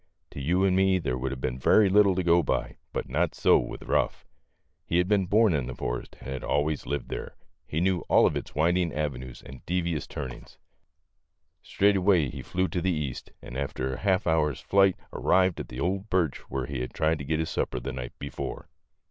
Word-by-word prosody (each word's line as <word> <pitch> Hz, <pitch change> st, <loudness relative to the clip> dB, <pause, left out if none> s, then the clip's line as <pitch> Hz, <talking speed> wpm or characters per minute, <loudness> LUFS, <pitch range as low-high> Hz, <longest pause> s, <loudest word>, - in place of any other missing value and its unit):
To 70 Hz, -, -7 dB
you 90 Hz, +7 st, +2 dB
and 95 Hz, -1 st, +3 dB
me 95 Hz, 0 st, +4 dB
there 70 Hz, -8 st, -2 dB
would 65 Hz, +1 st, -2 dB
have 65 Hz, -1 st, -6 dB
been 65 Hz, 0 st, -2 dB
very 105 Hz, +9 st, +5 dB
little 100 Hz, 0 st, +5 dB
to 95 Hz, -, 0 dB
go 85 Hz, 0 st, +5 dB
by, 70 Hz, -, -2 dB
but -, -, -3 dB
not 80 Hz, +6 st, 0 dB
so -, -, +5 dB
with -, -, -6 dB
Ruff. -, -, 0 dB, 0.6 s
He 85 Hz, -, 0 dB
had 90 Hz, 0 st, +2 dB
been 100 Hz, -2 st, +2 dB
born 105 Hz, 0 st, +4 dB
in 70 Hz, -5 st, -1 dB
the 65 Hz, -, -6 dB
forest, -, -, -4 dB
and -, -, -9 dB
had 65 Hz, -, -5 dB
always 75 Hz, +1 st, 0 dB
lived 70 Hz, -2 st, -3 dB
there. -, -, -6 dB, 0.3 s
He 80 Hz, -, -1 dB
knew 95 Hz, -1 st, +2 dB
all -, -, +6 dB
of -, -, +2 dB
its -, -, -5 dB
winding 85 Hz, +2 st, +2 dB
avenues 65 Hz, -5 st, -4 dB
and 65 Hz, -, -11 dB
devious 85 Hz, -4 st, -1 dB
turnings. 65 Hz, -2 st, -8 dB, 1.0 s
Straight 100 Hz, +1 st, +2 dB
away 90 Hz, -7 st, +3 dB
he -, -, -7 dB
flew 95 Hz, +1 st, -1 dB
to 90 Hz, +2 st, -2 dB
the 95 Hz, -, +1 dB
east, 75 Hz, -7 st, -3 dB
and 60 Hz, -, -9 dB
after 65 Hz, -1 st, -3 dB
half 95 Hz, 0 st, +1 dB
an 80 Hz, -, +3 dB
hour's 75 Hz, -4 st, +1 dB
flight 95 Hz, +3 st, +3 dB, 0.2 s
arrived 95 Hz, -1 st, +2 dB
at -, -, -5 dB
the 60 Hz, -, -7 dB
old 95 Hz, +6 st, -1 dB
birch 85 Hz, -7 st, +1 dB
where 65 Hz, -1 st, -2 dB
he 65 Hz, -1 st, -4 dB
had 65 Hz, -, -6 dB
tried 80 Hz, 0 st, +1 dB
to -, -, -5 dB
get 75 Hz, +3 st, -1 dB
his 80 Hz, -, -2 dB
sapper -, -, -1 dB
the 65 Hz, +2 st, -5 dB
night 60 Hz, -2 st, -7 dB
before. 70 Hz, -2 st, -6 dB
80 Hz, 215 wpm, -27 LUFS, 65-95 Hz, 1.0 s, all